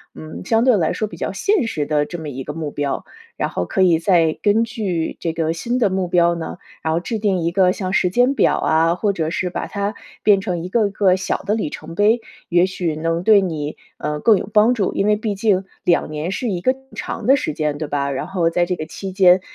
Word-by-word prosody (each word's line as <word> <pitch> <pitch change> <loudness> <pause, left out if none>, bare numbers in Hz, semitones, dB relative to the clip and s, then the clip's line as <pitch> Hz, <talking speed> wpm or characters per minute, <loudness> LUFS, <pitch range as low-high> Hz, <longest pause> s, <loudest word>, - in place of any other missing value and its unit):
嗯， 155 0 -8
相 225 +2 +2
对 250 -5 +4
来 160 -3 +1
说 215 - -2
比 - - -11
较 - - -3
现 400 - +1
实 150 -8 -2
的 150 -1 +1
这 175 +1 -7
么 155 -2 -6
一 135 0 -6
个 150 - -6
目 155 -2 -4
标。 145 -1 -2 0.3
然 - - -1
后 90 - -2
可 190 - -1
以 175 -3 +5
再 165 -2 +2
根 215 +2 +4
据 200 -8 -3
这 165 -1 -2
个 160 -1 -1
新 240 +9 -2
的 210 - +3
目 190 -1 -1
标 170 -1 +3
呢， 170 +1 -6 0.3
然 160 0 0
后 165 - +1
制 225 +5 -3
定 200 -4 +1
一 165 0 0
个 185 0 +4
像 185 -2 -4
时 180 - +3
间 250 +6 +3
表 - - +3
啊， 165 +1 +2
或 200 +1 0
者 160 -2 -2
是 180 0 -1
把 - - -4
它 200 0 -3 0.3
变 205 -2 +5
成 180 -4 -2
一 180 - -5
个 220 0 +2
一 - - -7
个 190 -2 +3
小 190 - -2
的 205 +3 -1
里 205 -9 -2
程 165 +2 -8
碑， 220 +4 +3 0.3
也 175 +1 +4
许 175 -4 -2
能 165 +2 -1
对 210 -2 +6
你， 155 -5 -3 0.2
呃， 150 0 -3
更 220 +1 +5
有 - - -4
帮 220 +4 +5
助。 200 -5 0
因 200 - 0
为 210 - +4
毕 210 -1 -2
竟 195 -2 +1 0.2
2 170 -3 +1
年 155 +3 -3
是 235 +3 -2
一 175 -2 -3
个 255 - +3
挺 265 0 -21
长 230 - -5
的 270 - +6
时 205 - -2
间， 150 -1 -2
对 155 - -3
吧？ 140 -1 -1
然 135 - -3
后 180 -3 +1
在 175 +1 +2
这 180 - -1
个 155 - -5
期 190 +4 -7
间， 185 -1 +5
180 Hz, 275 characters per minute, -20 LUFS, 160-210 Hz, 0.3 s, 对